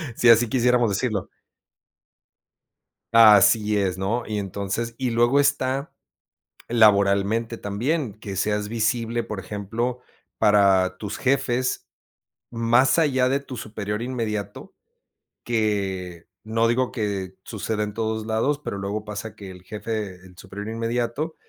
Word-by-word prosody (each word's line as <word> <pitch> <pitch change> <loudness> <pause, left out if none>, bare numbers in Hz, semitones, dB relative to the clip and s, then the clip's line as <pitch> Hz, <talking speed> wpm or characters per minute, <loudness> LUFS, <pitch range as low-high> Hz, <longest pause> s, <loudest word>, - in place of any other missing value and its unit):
si 120 - +4
así 115 0 +6
quisiéramos 125 -1 +3
decirlo. 100 -1 -2 1.8
Así 110 -1 +6
es, 95 -2 0
¿no?, 110 +6 -1
y 105 -1 -3
entonces, 100 +4 -3
y 130 -2 -1
luego 120 +4 +3
está 140 0 0 0.8
laboralmente 105 +1 +3
también, 120 +6 -2
que 100 -2 -8
seas 105 +1 -1
visible, 115 +1 -1
por 105 -2 -5
ejemplo, 110 +6 -3 0.4
para 95 -3 +3
tus 105 - -5
jefes 130 -1 0 0.7
más 120 +4 +3
allá 130 -6 +2
de 135 +1 +1
tu 140 -2 -9
superior 105 -1 -4
inmediato, 115 -5 -4 0.7
que 95 -6 -2 0.2
no 115 +1 +1
digo 125 +2 0
que 100 -5 -3
sucede 110 0 -3
en 105 0 -3
todos 110 0 -2
lados, 115 +7 0
pero 100 - -4
luego 100 +2 -4
pasa 105 0 -6
que 100 -3 -10
el 90 -1 -13
jefe, 105 -1 -4
el 90 -1 -16
superior 100 +2 -8
inmediato, 120 +7 -2
110 Hz, 125 wpm, -24 LUFS, 100-120 Hz, 1.8 s, así